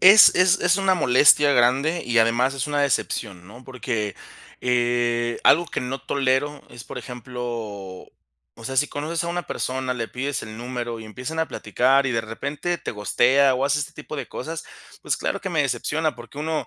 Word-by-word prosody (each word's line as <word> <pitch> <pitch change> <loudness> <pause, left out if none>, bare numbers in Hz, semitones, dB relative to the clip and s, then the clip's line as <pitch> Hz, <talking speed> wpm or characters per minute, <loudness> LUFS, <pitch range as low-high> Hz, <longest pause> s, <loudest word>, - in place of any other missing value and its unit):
Es 195 +3 +9
es 185 +1 +4
es 180 0 +3
una 195 -1 +2
molestia 145 -1 +5
grande, 135 +7 +2
y 120 -1 +1
además 120 +4 +3
es 135 -2 -2
una 145 -1 0
decepción, 105 -9 -2
¿no? 120 +6 -13
Porque, 115 -6 -3 0.5
eh, 120 -1 0
algo 170 +4 +5
que - - -4
no 130 +2 -4
tolero 140 +1 0
es, 120 - -11
por - - -8
ejemplo, 125 0 -8 1.2
o 115 - -12
sea, 135 - -4
si 150 +2 +3
conoces 155 +3 -3
a - - -4
una 175 +1 -2
persona, 130 0 -2
le 115 -3 -4
pides 135 +3 -3
el 110 0 -8
número, 120 -1 -5
y 110 - -9
empiezan 125 +9 -6
a 160 - +1
platicar 135 0 +1
y, - - 0
de 115 - 0
repente, 140 +10 -4
te - - -5
ghostea, 130 +6 +3
o 130 +2 0
hace 140 +1 +1
este 145 - -4
tipo 150 0 -8
de 135 -4 -5
cosas, 160 +5 -6 0.4
pues, - - -1
claro - - -2
que - - -3
me - - +1
decepciona. 155 0 -1
Porque 120 +3 -12
uno 155 +1 -2
130 Hz, 195 wpm, -23 LUFS, 120-150 Hz, 1.2 s, Es